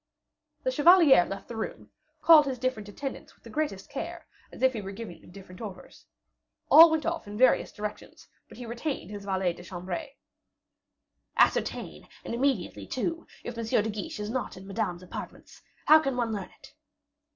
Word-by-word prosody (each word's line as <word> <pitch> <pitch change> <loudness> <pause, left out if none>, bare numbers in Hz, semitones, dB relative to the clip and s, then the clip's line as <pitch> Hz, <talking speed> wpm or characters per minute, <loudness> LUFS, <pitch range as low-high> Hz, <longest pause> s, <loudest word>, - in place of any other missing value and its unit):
The - - +1
chevalier 320 - +6
left 195 0 -7
the 235 - -7
room, 220 - -6 0.3
called 310 -3 +8
his 260 -2 -2
different 235 -5 -3
attendant 270 +6 -7
with - - -34
the - - -12
greatest 295 -11 -2
care, - - -6 0.3
as - - -9
if 260 0 +5
he 220 - -4
were 195 0 -6
giving 205 -4 -9
them - - -17
different 185 +1 -13
orders. 195 -5 -10 0.6
All 330 +1 +11
went 320 -1 0
off 335 -8 -2
in 205 0 -7
various 255 +2 +4
directions; 210 0 -8 0.2
but - - -13
he 245 - -7
retained 235 - -4
his 205 -1 -7
valet 190 -3 0
de 175 - -12
chambre. 185 - -5 1.3
"Ascertain, - - +1 0.2
and - - -4
immediately, 235 - -1
too, 330 +6 -3 0.2
of 240 - -5
M. 230 - -4
de 220 -1 +1
Guiche 205 0 -6
is 210 +1 -4
not 255 -6 -3
in 190 - -11
Madame's 195 -3 -3
apartments. 180 - -9 0.2
How 310 +1 +8
can 275 -5 -2
one 235 -2 0
learn 200 -3 -5
it?" - - -16
225 Hz, 180 wpm, -28 LUFS, 195-275 Hz, 1.3 s, All